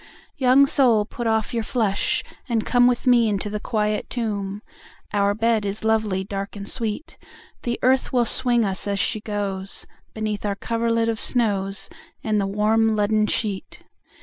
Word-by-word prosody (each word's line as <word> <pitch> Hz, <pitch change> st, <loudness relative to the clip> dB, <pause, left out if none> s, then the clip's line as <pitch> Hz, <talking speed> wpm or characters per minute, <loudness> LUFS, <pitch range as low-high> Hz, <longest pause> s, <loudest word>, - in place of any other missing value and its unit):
II. -, -, -20 dB, 0.3 s
Young 265 Hz, +1 st, +5 dB
soul 240 Hz, -6 st, +3 dB
put 240 Hz, +2 st, -5 dB
off 220 Hz, +2 st, 0 dB
your 230 Hz, -, 0 dB
flesh, 215 Hz, -3 st, 0 dB, 0.3 s
and 225 Hz, -2 st, 0 dB
come 245 Hz, -1 st, +4 dB
With 245 Hz, -1 st, 0 dB
me 240 Hz, -3 st, +5 dB
into 205 Hz, 0 st, -2 dB
the 210 Hz, -, -2 dB
quiet 210 Hz, -2 st, -1 dB
tomb, 205 Hz, -4 st, -3 dB, 0.5 s
Our 200 Hz, 0 st, +2 dB
bed 225 Hz, 0 st, +1 dB
is 205 Hz, +2 st, -3 dB
lovely, 215 Hz, -4 st, +1 dB
dark, 195 Hz, +1 st, -5 dB
and 200 Hz, 0 st, -6 dB
sweet; 225 Hz, +5 st, -4 dB, 0.4 s
The 240 Hz, -1 st, -2 dB
earth 260 Hz, +1 st, +3 dB
will 245 Hz, -2 st, +2 dB
swing 240 Hz, -2 st, +2 dB
us, 195 Hz, +1 st, -1 dB
as 200 Hz, 0 st, 0 dB
she 215 Hz, +2 st, 0 dB
goes, 200 Hz, -2 st, -4 dB, 0.3 s
Beneath 215 Hz, -1 st, -3 dB
our 205 Hz, -1 st, -1 dB
coverlid 230 Hz, +1 st, 0 dB
of 225 Hz, -1 st, -1 dB
snows, 200 Hz, -5 st, 0 dB, 0.4 s
And 215 Hz, -2 st, +1 dB
the 195 Hz, -, -1 dB
warm 215 Hz, +2 st, +2 dB
leaden 210 Hz, 0 st, +2 dB
sheet. 205 Hz, -4 st, -3 dB
215 Hz, 170 wpm, -23 LUFS, 205-235 Hz, 0.5 s, Young